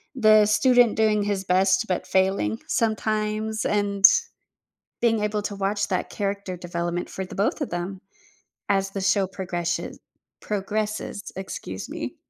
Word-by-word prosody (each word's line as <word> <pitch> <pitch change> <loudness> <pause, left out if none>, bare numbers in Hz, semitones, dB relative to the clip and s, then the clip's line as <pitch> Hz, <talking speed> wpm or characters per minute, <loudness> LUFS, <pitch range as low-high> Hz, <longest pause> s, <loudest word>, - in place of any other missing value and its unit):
the 215 -3 +6
student 245 +2 +4
doing 215 -2 +3
his 200 -2 -2
best, 190 +3 +3
but 185 - -1
failing 190 - +1
sometimes 215 -1 -1
and 200 -1 +2 1.0
being 225 -2 +2
able 210 0 0
to 205 - -4
watch 200 +1 -1
that 185 - -2
character 200 -2 -3
development 175 0 -3
for 190 - -5
the - - -10
both 205 +10 0
of - - -3
them 175 +2 -4 0.7
as 195 -1 +1
the 195 - -4
show 190 0 +2
progreshe 175 -2 -3 0.4
progresses, 210 0 -3
excuse 100 - -6
me. - - -5
200 Hz, 135 wpm, -24 LUFS, 190-215 Hz, 1.0 s, the